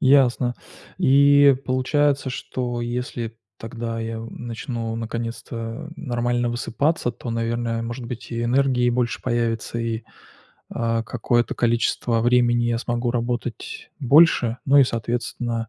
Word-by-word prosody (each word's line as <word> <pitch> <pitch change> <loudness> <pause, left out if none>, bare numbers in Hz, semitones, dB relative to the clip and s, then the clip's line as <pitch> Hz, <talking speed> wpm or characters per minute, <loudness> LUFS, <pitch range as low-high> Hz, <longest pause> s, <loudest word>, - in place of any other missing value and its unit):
Ясно. 130 -2 +4 0.4
И 140 +1 +6
получается, 140 +2 +1
что 125 -1 -3
если 120 -1 -4 0.2
тогда 115 0 -5
я 115 0 -4
у 115 - -7
начну 115 -1 -5
наконец-то 115 +3 -5
нормально 120 -2 -1
высыпаться, 125 +4 0
то, 120 - -7
наверное, 115 0 -1
может 120 +2 -5
быть, 120 0 -7
и 115 -1 -2
энергии 125 0 +2
больше 120 0 -1
появится, 115 -1 -1
и, 115 -1 -2 0.7
а, 115 -1 -1
какое-то 120 +1 0
количество 115 0 +1
времени 120 0 +3
я 120 -1 +1
смогу 120 0 -1
работать 120 -1 -4
больше, 135 -4 +5
ну 140 +1 +5
и, 140 - +8
соответственно, 115 -1 -3
120 Hz, 120 wpm, -23 LUFS, 115-125 Hz, 0.7 s, и